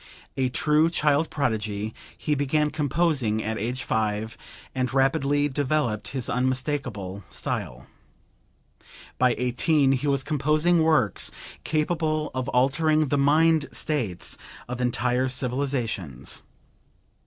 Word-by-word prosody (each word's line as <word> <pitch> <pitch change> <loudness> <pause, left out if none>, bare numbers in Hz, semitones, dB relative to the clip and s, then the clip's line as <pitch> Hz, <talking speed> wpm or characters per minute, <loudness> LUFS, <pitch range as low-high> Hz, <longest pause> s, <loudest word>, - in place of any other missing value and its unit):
A 130 -1 +1
true 150 +4 +3
child 150 -1 +2
prodigy, 110 -6 -2 0.2
he 150 - -1
began 150 +1 +1
composing 145 -7 0
at 110 0 -2
age 125 +4 -3
5 110 0 -1 0.4
and 130 -1 -1
rapidly 135 +2 +2
developed 130 -7 -1
his 130 -3 -3
unmistakable 125 -7 -2
style; - - -4 1.3
by 125 -1 +4
18 135 +4 +2
he 135 +2 0
was 140 -1 +1
composing 155 +4 +2
works 155 - +3 0.3
capable 155 0 0
of 130 -1 -2
altering 155 +4 +2
the 145 - +1
mind 155 +2 +3
states 120 - -1 0.3
of 125 0 -4
entire 125 +1 +1
civilizations. 125 - -2
135 Hz, 110 wpm, -25 LUFS, 120-150 Hz, 1.3 s, by